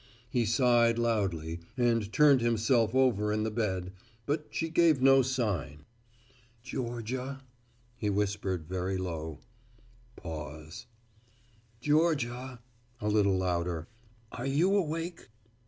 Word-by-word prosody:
He 120 -3 +1
sighed 115 0 +4
loudly 95 -9 -1 0.2
and 115 -4 +1
turned 145 -2 +5
himself 115 0 +2
over 115 -6 +3
in 110 0 0
the 110 - -1
bed, 95 -5 -2 0.3
but 150 +1 -1
she 165 - -2
gave 165 -3 +4
no 135 +1 +6
sign. 100 - -2 0.8
"Georgia," 125 +1 -4 0.5
he 110 -3 -1
whispered 100 -4 -1
very 95 +2 -2
low. 80 -4 -5 0.7
Pause. 80 - -8 0.9
"Georgia," 130 -5 0 0.4
a 105 - -1
little 100 -2 +3
louder, 85 -2 -1 0.4
"are - - -5
you 165 +9 +3
awake?" 165 -2 -2
115 Hz, 105 wpm, -30 LUFS, 95-130 Hz, 0.9 s, no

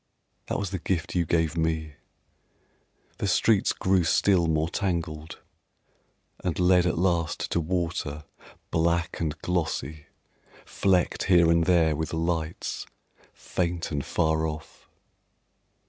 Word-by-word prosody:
That - - -1
was 100 -3 -3
the 95 - -3
gift 85 -1 -2
you 85 -2 +1
gave 80 0 +1
me.... 80 -2 -1 1.3
The - - -1
streets 100 +2 +3
grew 95 -1 +2
still 85 +1 +3
more 80 0 +1
tangled, 85 -4 -3 1.1
And 90 -4 -1
led 90 0 +4
at 85 - 0
last 85 -3 0
to - - +2
water 80 -3 -2 0.5
black 85 +1 0
and 80 -2 -2
glossy, 80 -4 -2 0.6
Flecked 95 -3 +1
here 85 -3 +5
and 85 0 +3
there 80 -3 +3
with 80 +1 -3
lights, 80 0 -2 0.4
faint 85 -2 -3
and 70 -2 -2
far 80 0 +1
off. 75 0 -9
85 Hz, 120 wpm, -26 LUFS, 80-90 Hz, 1.3 s, here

